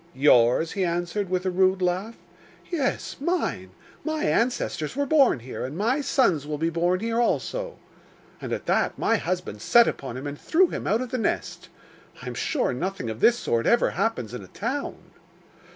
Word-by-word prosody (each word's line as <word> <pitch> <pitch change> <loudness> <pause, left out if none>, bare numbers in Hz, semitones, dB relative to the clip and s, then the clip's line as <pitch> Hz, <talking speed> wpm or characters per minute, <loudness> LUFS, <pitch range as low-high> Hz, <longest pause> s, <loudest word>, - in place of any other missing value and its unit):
"Yours?" 130 +2 +4
he 195 - -1
answered, 175 +3 -2
with 185 0 -1
a 185 - +1
rude 190 +1 +3
laugh. 185 +5 -1 0.6
"Yes, 290 -7 -2
mine; 345 +5 -1 0.3
my 315 0 -2
ancestors 230 - 0
were 285 +1 0
born 275 - +4
here, 125 +2 -6
and 135 +5 -5
my 240 +8 +1
sons 185 - +1
will 150 -1 -3
be 165 +2 0
born 175 +3 +1
here 230 +1 0
also." - - -1 0.6
And - - -6
at - - -3
that - - +1
my 225 - +2
husband 175 - -4
set 235 - +5
upon 130 -3 -4
him 135 - -7
and 145 0 -6
threw 360 +2 +3
him - - -5
out 220 +4 +2
of 255 - -5
the 255 - -1
nest. - - -3 0.5
I - - -11
am - - -4
sure 305 - -1
nothing 135 -4 -3
of 110 - -7
this 240 - +5
sort 115 - 0
ever 235 - +3
happens 190 - -2
in 125 - -5
a 95 - -11
town. 260 - -4
190 Hz, 185 wpm, -25 LUFS, 150-250 Hz, 0.6 s, set